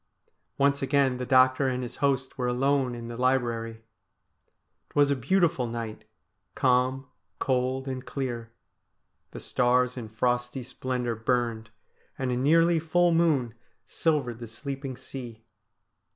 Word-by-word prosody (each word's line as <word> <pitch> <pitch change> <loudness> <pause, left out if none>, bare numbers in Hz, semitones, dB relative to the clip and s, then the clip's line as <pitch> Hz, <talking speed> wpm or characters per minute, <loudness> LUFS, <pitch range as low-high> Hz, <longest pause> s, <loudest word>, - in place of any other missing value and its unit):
Once 140 0 +2
again 135 -2 +2
the 125 0 -4
doctor 130 0 +4
and 125 -1 -1
his 120 - -7
host 135 -2 0
were 125 -2 -2
alone 130 0 +1
in 120 0 -7
the 120 - -6
library. 115 -3 0 1.1
It - - -27
was 145 -1 +4
a - - +3
beautiful 155 0 +1
night, 115 -2 -6 0.5
calm, 130 +1 +2 0.3
cold, 130 +1 0
and 130 -1 -4
clear. 120 -4 -4 0.8
The - - -9
stars 125 +1 +1
in 115 -3 -6
frosty 125 +3 -1
splendour 125 -1 -3
burned, 115 -1 -1 0.5
and 130 -1 -1
a - - 0
nearly 165 +6 +4
full 175 +2 +2
moon 155 -8 +2 0.3
silvered 140 -8 -1
the 120 - -7
sleeping 135 +2 -6
sea. 120 -5 -9
130 Hz, 135 wpm, -27 LUFS, 120-140 Hz, 1.1 s, doctor